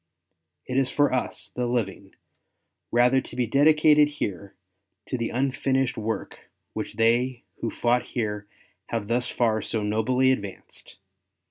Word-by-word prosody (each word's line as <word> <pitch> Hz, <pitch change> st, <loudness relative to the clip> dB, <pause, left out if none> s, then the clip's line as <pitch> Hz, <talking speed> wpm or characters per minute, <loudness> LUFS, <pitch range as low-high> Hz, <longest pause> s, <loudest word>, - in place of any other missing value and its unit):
It 130 Hz, -, -2 dB
is 135 Hz, -1 st, +3 dB
for 145 Hz, -2 st, +2 dB
us, 130 Hz, -, -2 dB
the 125 Hz, -1 st, -2 dB
living, 100 Hz, -5 st, -3 dB, 0.8 s
rather 125 Hz, +2 st, +4 dB
to -, -, -11 dB
be 125 Hz, -, +1 dB
dedicated 150 Hz, +3 st, +5 dB
here 100 Hz, -10 st, -5 dB, 0.5 s
to -, -, -3 dB
the 115 Hz, -2 st, -2 dB
unfinished 135 Hz, 0 st, 0 dB
work 110 Hz, -1 st, -5 dB, 0.2 s
which -, -, -5 dB
they 120 Hz, +2 st, +2 dB
who 115 Hz, -, -2 dB
fought 120 Hz, +2 st, +1 dB, 0.2 s
here 105 Hz, -2 st, -2 dB, 0.4 s
have 115 Hz, -3 st, -3 dB
thus 120 Hz, +1 st, +1 dB
far 110 Hz, -2 st, +1 dB
so 110 Hz, -2 st, -2 dB
nobly 125 Hz, +5 st, +2 dB
advanced. 100 Hz, -7 st, -6 dB
120 Hz, 135 wpm, -25 LUFS, 110-130 Hz, 0.8 s, dedicated